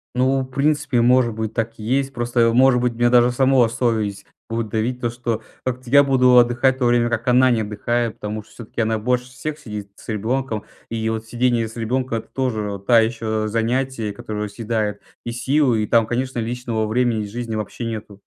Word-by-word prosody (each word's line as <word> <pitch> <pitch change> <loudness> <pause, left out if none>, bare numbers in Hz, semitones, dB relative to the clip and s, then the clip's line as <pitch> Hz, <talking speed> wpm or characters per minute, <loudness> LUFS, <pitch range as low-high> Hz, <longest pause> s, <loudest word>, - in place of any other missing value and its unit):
Ну, 130 +2 +2
в - - -2
принципе, 145 -2 +1
может 125 -1 +4
быть, 110 0 -4
так 115 0 -1
и - - -7
есть. 135 +4 0
Просто, 120 -1 +1
может 130 0 +5
быть, 125 -1 0
меня 120 +1 +2
даже 120 0 +5
самого 130 -1 +4
совесть 110 -4 -1 0.2
будет 115 -1 -3
давить: 115 +4 -1
то, 120 - 0
что 115 -1 -3 0.2
как-то 125 -1 -4
я 140 +2 +7
буду 125 -2 +4
отдыхать 120 +2 +4
в - - -17
то 125 - +1
время, 120 0 +3
как 120 0 -2
она 130 +1 +5
не 115 -2 +2
отдыхает, 115 +2 -1
потому 105 0 -4
что - - -23
всё-таки 115 0 -6
она 110 0 0
больше 125 +2 0
всех 145 +4 -5
сидит 105 -8 -7
с - - -16
ребенком, 110 +1 -2 0.2
и 110 -1 -2
вот 110 0 -3
сидение 120 0 +1
с 110 - -12
ребенком- 120 +1 -1
это - - -13
тоже 110 -6 -2
та 120 0 +6
еще 110 -1 -1
занятие, 115 0 -1
которое 105 0 -5
съедает 110 -1 -2 0.2
и 120 - -3
силы, 125 -1 +1
и 105 - -3
там, 115 -1 +4
конечно, 125 +2 -2
личного 115 -1 -2
времени 110 -1 0
жизни 115 +2 -5
вообще 110 +2 -4
нету. 110 -3 -6
120 Hz, 200 wpm, -21 LUFS, 110-125 Hz, 0.2 s, я